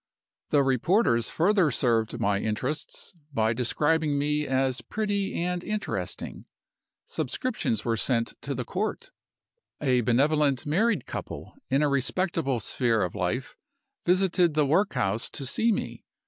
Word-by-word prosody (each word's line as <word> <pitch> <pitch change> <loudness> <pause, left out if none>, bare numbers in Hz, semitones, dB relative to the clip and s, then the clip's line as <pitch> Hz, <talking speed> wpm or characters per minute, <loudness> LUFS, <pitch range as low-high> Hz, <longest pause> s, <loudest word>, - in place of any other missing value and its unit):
The 145 -1 +4
reporters 135 - +2
further 185 -1 +3
served 120 -3 +1
my 100 -3 +1
interests 125 - -3 0.2
by 110 -4 +1
describing 150 +5 +1
me 150 +1 0
as 130 -1 +1
'pretty 205 -2 -2
and 180 +1 -1
interesting.' 215 0 -4 0.6
Subscriptions 220 - -2
were 115 -1 +1
sent 115 +1 0
to 140 0 -3
the 125 -1 -3
court. 215 - -3 0.7
A 130 -4 +2
benevolent 140 +3 +2
married 210 +11 +1
couple, - - -7 0.2
in 140 +2 +3
a - - +4
respectable 140 0 0
sphere 115 -2 +1
of 90 - -3
life, 100 +7 -2 0.5
visited 180 -2 +3
the 150 -1 +3
workhouse 130 - +1
to 140 - -5
see 225 - +2
me. - - -3
140 Hz, 130 wpm, -27 LUFS, 120-180 Hz, 0.7 s, The